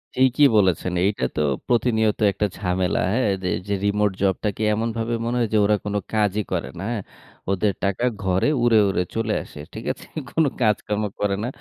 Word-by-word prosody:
ঠিকই 130 +3 +4
বলেছেন। 90 -2 +2
এইটা 100 -10 0
তো 75 - 0 0.3
প্রতিনিয়ত 110 -3 +2
একটা 100 +2 0
ঝামেলা 90 -1 0
হ্যাঁ? 125 -2 +2
যে, 90 - 0 0.2
যে, 100 - -1
রিমোট 105 0 +2
জবটাকে 100 +2 0
এমনভাবে 115 +1 -2
মনে 120 +1 -1
হয় 115 - +2
যে, - - +4
ওরা 105 +1 +4
কোন 105 - -2 0.2
কাজই 105 -1 +1
করে 85 -3 -2
না। - - -5
হ্যাঁ? 115 -4 -2 0.5
ওদের 100 +1 +1
টাকা 100 +5 0 0.2
ঘরে 95 +3 +2 0.2
উড়ে, 120 -2 +5
উড়ে 90 -2 +1
চলে 115 -1 0
আসে। - - -13
ঠিক - - -7
আছে? - - -9 0.2
কোন 160 - +2 0.2
কাজকর্ম 105 -1 +1 0.2
করে 100 -1 +1
না। - - -1
105 Hz, 180 wpm, -23 LUFS, 95-115 Hz, 0.5 s, উড়ে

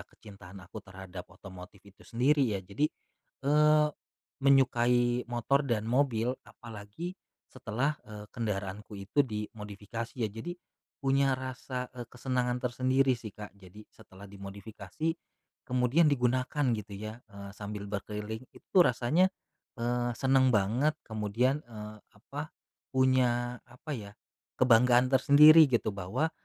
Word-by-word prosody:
kecintaan 100 -2 -13
aku 90 +5 -9
terhadap 95 -1 -9
otomotif 95 0 -12
itu 100 -1 -18
sendiri 140 +5 +2
ya 95 - -2
jadi, 100 +11 0 0.6
eee, 150 +1 +5 0.5
menyukai 125 -2 +3
motor 140 +4 +1
dan 110 -4 0
mobil. 125 -1 +1
Apalagi 115 - -8 0.4
setelah, 130 +4 -2
eee, 105 -1 -9
kendaraanku 105 -2 -4
itu 100 +9 0
dimodifikasi 105 +1 -6
ya. - - -5
Jadi 115 +12 -6 0.5
punya 135 0 +3
rasa, 130 -1 -5
eee, 120 -2 -6
kesenangan 125 -1 -1
tersendiri 130 +1 +2
sih 110 -3 -9
Kak. 105 -2 -9
Jadi 100 +2 -14
setelah 95 +2 -15
dimodifikasi 100 +9 -5 0.5
kemudian 125 +6 +3
digunakan 130 +2 +1
gitu 105 0 -9
ya, 110 +3 -7
eee, 100 0 -9
sambil 100 0 -6
berkeliling, 105 +2 -5
itu - - -17
tuh 180 -2 +7
rasanya, 130 +10 +3 0.5
eee, 120 0 0
senang 130 -1 +4
banget, 120 +10 +2
kemudian, 115 +6 0
eee, 105 -2 -9 0.2
apa, 145 +8 -8 0.4
punya, 125 -2 +2
apa 125 +5 -11
ya, 105 -5 -8 0.5
kebanggaan 125 +1 +5
tersendiri 150 +4 +8
gitu 115 -3 +1
bahwa, 100 - -1
120 Hz, 120 wpm, -30 LUFS, 105-130 Hz, 0.6 s, tersendiri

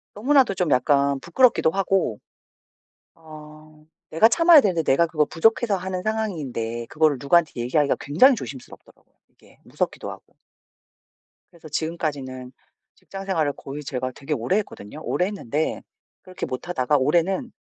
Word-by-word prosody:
너무나도 260 +1 +3
좀 180 -4 -1
약간 140 +2 +2
부끄럽기도 195 - +2
하고 190 - 0 1.0
어 155 -1 -15 0.3
내가 165 +8 +5
참아야 330 +5 +6
되는데 185 -8 0
내가 160 +3 +3
그거 155 -2 +1
부족해서 215 - +1
하는 185 0 -4
상황인데 145 - -3
그거를 155 -1 +1
누구한테 160 +3 +2
얘기하기가 130 +4 +1
굉장히 255 - +4
조심스럽더라고요 135 - -11 0.2
이게. - - -24
무섭기도 - - -4
하고. - - -13 1.2
그래서 165 -2 -14
지금까지는 145 -5 -4 0.4
직장 195 0 -10
생활을 160 -7 0
거의 145 +2 -8
제가 130 -2 -4
되게 145 +2 -4
오래 140 - 0
했거든요. 150 - -6
오래 180 - 0
했는데 160 - -3 0.4
그렇게 185 -1 -7
못하다가 130 +1 -1
올해는 175 - 0
160 Hz, 365 characters per minute, -23 LUFS, 140-190 Hz, 1.2 s, 참아야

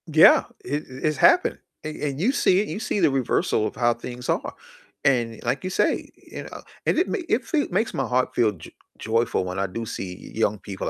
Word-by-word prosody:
Yeah, 155 0 +7 0.2
it 145 +2 -2
it's 140 +3 -2
happening, - - +4 0.2
and 155 0 -5
and 140 -2 -3
you 215 +10 +3
see 195 -8 +3
you 210 - -5
see 215 - -1
the 145 - +4
reversal 125 -4 +1
of - - -7
how 120 0 +2
things 125 +1 -8
are, - - -1 0.5
and, 120 -5 +1
like 125 +7 -1
you 185 - -2
say, 185 - 0
you - - -10
know, - - -9 0.2
and - - +2
it 355 - +3
ma 430 - -2
it 235 +1 +1
feel 295 +3 0
makes 225 - 0
my - - -1
heart 125 +1 +1
feel 110 -3 +3
jo 85 - -12 0.3
joyful 115 -3 0
when 90 +1 -4
I 100 - 0
do 115 +5 -5
see 90 -4 -7
young 105 -2 0
people 95 -1 -5
125 Hz, 215 wpm, -24 LUFS, 115-155 Hz, 0.5 s, Yeah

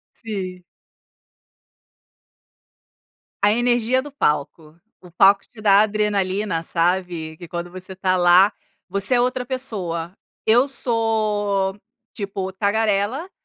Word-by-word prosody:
Sim. 185 -5 -6 2.8
A 205 - +5
energia 240 +2 +2
do 290 - -10
palco. 155 - -2 0.2
O 180 - -15
palco 195 +3 +5
te 225 - -16
dá 205 -1 +6
adrenalina, 205 -4 0
sabe? 170 -2 -1
Que 175 - -10
quando 175 +1 -5
você 185 +1 -10
está 185 0 0
lá, 180 +3 +6 0.4
você 200 +6 +1
é 240 - +3
outra 250 0 -1
pessoa. 190 -10 -4 0.3
Eu 240 +5 +4
sou, 215 -6 0 0.4
tipo, 195 -2 -4
tagarela, 210 - 0
200 Hz, 105 wpm, -21 LUFS, 180-225 Hz, 2.8 s, dá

